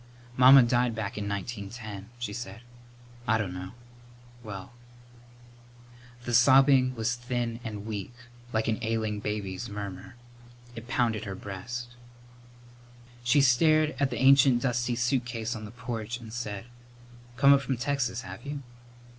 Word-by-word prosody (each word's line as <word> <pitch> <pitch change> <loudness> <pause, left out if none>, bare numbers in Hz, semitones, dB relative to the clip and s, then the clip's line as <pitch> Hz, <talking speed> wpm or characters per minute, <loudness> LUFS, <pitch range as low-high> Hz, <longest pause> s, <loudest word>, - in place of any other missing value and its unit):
"Mamma 130 +1 +9
died 120 -1 +1
back 110 -3 -4
in 100 -1 -3
1910," 100 0 -6
she 120 -4 -4
said. 115 0 -7 0.7
"I 110 - +4
dunno 90 -2 -5 0.7
well 100 0 -8 0.8
" 120 0 -22
The 120 - -3
sobbing 130 +1 +5
was 115 +1 0
thin 120 -1 -3
and 105 -3 -6
weak, 105 0 -5 0.4
like 110 0 0
an 110 -1 0
ailing 110 -2 -1
baby's 105 0 -4
murmur. 100 -1 -7 0.6
It 115 +1 -9
pounded 115 -4 0
her 95 -2 -5
breast. 115 +6 -6 1.3
She 125 +4 +4
stared 155 +4 +4
at 140 -1 +2
the - - -4
ancient 135 -2 +5
dusty 120 -1 0
suitcase 120 -2 -1
on 110 -1 -7
the - - -8
porch 120 0 -5
and 110 -2 -10
said, 105 -4 -5 0.7
"Come 140 +1 +7
up 140 - +3
from 135 -2 -2
Texas, 125 -2 -1
have - - -9
you?" 145 -1 -6
120 Hz, 140 wpm, -28 LUFS, 105-125 Hz, 1.3 s, Mamma